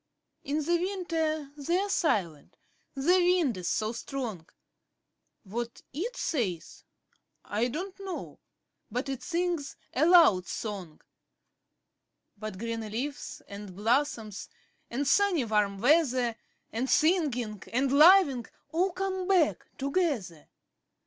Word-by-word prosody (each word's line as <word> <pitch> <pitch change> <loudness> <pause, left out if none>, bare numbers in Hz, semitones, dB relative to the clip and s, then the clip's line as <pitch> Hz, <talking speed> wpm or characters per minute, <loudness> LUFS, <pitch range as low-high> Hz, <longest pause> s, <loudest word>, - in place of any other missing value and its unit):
In 300 +2 -1
the 345 +2 +3
winter 330 -5 -2
they're 345 +7 0
silent 190 - -1 0.4
the 340 +7 +3
wind 350 - +3
is 180 -1 -5
so 215 0 0
strong; 230 -8 -5 1.0
What 235 +3 -5
it 440 - -4
says, 200 - -3 0.6
I 220 +4 0
don't 365 +10 -5
know, 385 -2 -6 0.5
but 250 +4 -3
it 270 -2 -4
sings 345 -5 -2 0.2
a 300 +6 +3
loud 310 - +6
song. 195 -8 -6 1.3
But 215 -2 -6
green 230 +2 -3
leaves, 240 +7 -5
and 200 -2 -9
blossoms, 225 -1 -1 0.4
and 270 +4 -2
sunny 365 -5 +3
warm 210 -2 +1
weather, 250 -1 +3
5 - - -30 0.4
And 250 +4 -2
singing, 275 - +2
and 260 +2 +1
loving 295 - +6 0.2
all 360 +3 +1
come 375 0 -2
back 325 - +2
together. 275 - -1
275 Hz, 115 wpm, -29 LUFS, 215-345 Hz, 1.3 s, loud